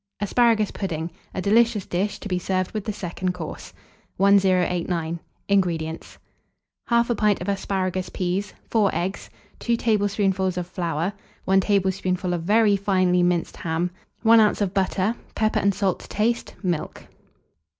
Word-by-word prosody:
ASPARAGUS 215 Hz, 0 st, +2 dB
PUDDING. 170 Hz, -4 st, -4 dB, 0.2 s
(A 185 Hz, -, -2 dB
delicious 220 Hz, 0 st, +3 dB
Dish, 195 Hz, +4 st, -2 dB
to -, -, -6 dB
be 180 Hz, -2 st, -1 dB
served 185 Hz, +1 st, -1 dB
with 215 Hz, -2 st, -4 dB
the 215 Hz, -, -1 dB
Second 185 Hz, -2 st, -3 dB
Course.) 160 Hz, -3 st, -7 dB, 0.5 s
1089. 180 Hz, -4 st, +2 dB, 0.3 s
INGREDIENTS. 170 Hz, -5 st, -1 dB, 0.7 s
1/2 235 Hz, 0 st, +3 dB
pint 210 Hz, -2 st, +2 dB
of -, -, -6 dB
asparagus 190 Hz, -2 st, -1 dB
peas, 185 Hz, +3 st, -2 dB, 0.2 s
4 215 Hz, -3 st, +3 dB
eggs, 185 Hz, +3 st, -3 dB, 0.3 s
2 235 Hz, -1 st, 0 dB
tablespoonfuls 200 Hz, -4 st, +1 dB
of 180 Hz, -, -2 dB
flour, 170 Hz, 0 st, -2 dB, 0.3 s
1 190 Hz, 0 st, +4 dB
tablespoonful 190 Hz, -2 st, 0 dB
of 175 Hz, -, -2 dB
very 210 Hz, +3 st, +4 dB
finely 185 Hz, -2 st, +2 dB
minced 175 Hz, -1 st, 0 dB
ham, 170 Hz, +2 st, -1 dB, 0.3 s
1 225 Hz, 0 st, +7 dB
oz. 215 Hz, -1 st, +3 dB
of 200 Hz, -3 st, -1 dB
butter, 195 Hz, +2 st, +1 dB, 0.2 s
pepper 215 Hz, 0 st, +1 dB
and 200 Hz, -1 st, +2 dB
salt 190 Hz, -2 st, 0 dB
to -, -, -12 dB
taste, 230 Hz, +3 st, -1 dB
milk. 175 Hz, -4 st, -2 dB
190 Hz, 140 wpm, -24 LUFS, 180-205 Hz, 0.7 s, 1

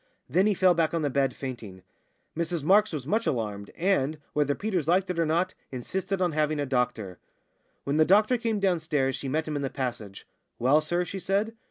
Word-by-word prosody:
Then 190 Hz, +3 st, +3 dB
he 210 Hz, -, +2 dB
fell 185 Hz, 0 st, +4 dB
back 165 Hz, -1 st, +1 dB
on 165 Hz, -, -1 dB
the 145 Hz, -, 0 dB
bed 135 Hz, -1 st, +1 dB
fainting. 110 Hz, -8 st, -7 dB, 0.5 s
Mrs 170 Hz, -1 st, -2 dB
Marks 205 Hz, +6 st, +4 dB
was 150 Hz, -6 st, -4 dB
much 220 Hz, +9 st, 0 dB
alarmed, 105 Hz, -4 st, -2 dB
and 160 Hz, -5 st, +1 dB, 0.2 s
whether 145 Hz, -1 st, +1 dB
Peters 190 Hz, -8 st, -2 dB
liked 185 Hz, +2 st, +2 dB
it 175 Hz, -, -3 dB
or 165 Hz, -, +2 dB
not 175 Hz, +4 st, +1 dB, 0.2 s
insisted 185 Hz, +9 st, -2 dB
on 175 Hz, -, +1 dB
having 155 Hz, 0 st, 0 dB
a 145 Hz, -, 0 dB
doctor. 125 Hz, -8 st, -2 dB, 0.6 s
When 140 Hz, +2 st, -1 dB
the 155 Hz, -, +6 dB
doctor 210 Hz, +8 st, +4 dB
came 225 Hz, -2 st, -1 dB
downstairs 155 Hz, -8 st, +1 dB
she 135 Hz, -, -5 dB
met 155 Hz, +3 st, -1 dB
him 155 Hz, -, -3 dB
in 145 Hz, -, -2 dB
the 135 Hz, -, -2 dB
passage. 120 Hz, -8 st, -5 dB, 0.3 s
"Well, 135 Hz, +6 st, +4 dB
sir?" 175 Hz, +3 st, -1 dB
she 195 Hz, -, -6 dB
said. 200 Hz, +4 st, 0 dB
155 Hz, 205 wpm, -27 LUFS, 135-185 Hz, 0.6 s, the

